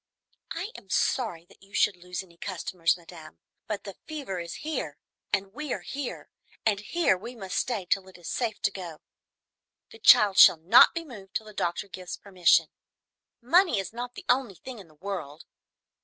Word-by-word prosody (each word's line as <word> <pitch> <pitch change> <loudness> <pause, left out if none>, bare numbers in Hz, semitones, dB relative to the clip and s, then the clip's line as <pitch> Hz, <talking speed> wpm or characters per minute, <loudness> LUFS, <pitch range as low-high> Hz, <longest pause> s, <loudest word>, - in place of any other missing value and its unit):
I 365 +7 -4
am - - -12
sorry 180 -10 0
that - - -22
you 195 +1 -14
should 200 - +3
lose 180 +1 -6
any 170 -2 -20
customers, 180 -1 -1
madame, 165 - -13 0.3
but 205 -2 -3
the 195 -2 -9
fever 280 - -5
is 170 0 -6
here 250 - -3 0.3
and 195 -1 -1
we 295 +1 -5
are - - -4
here, 275 -2 -6 0.3
and 210 -3 +2
here 330 - +1
we 235 +7 -8
must 190 -5 -6
stay 225 -7 -1
till 190 +1 0
it 190 - -14
is 175 - -11
safe 230 -4 -2
to - - +3
go. 175 -5 -8 0.9
The 450 - -13
child 210 - +7
shall - - +9
not 180 - +7
be 335 0 -3
moved 205 -9 -12
till 220 - -1
the 215 - -12
doctor 175 +1 -2
gives 185 -1 -7
permission. 185 -3 +3 0.7
Money 340 - +4
is 195 +1 -3
not 245 +1 -6
the - - -10
only 245 -5 +2
thing 250 +5 -9
in 190 - -12
the 155 - -22
world! 165 -4 -6
195 Hz, 185 wpm, -27 LUFS, 180-245 Hz, 0.9 s, shall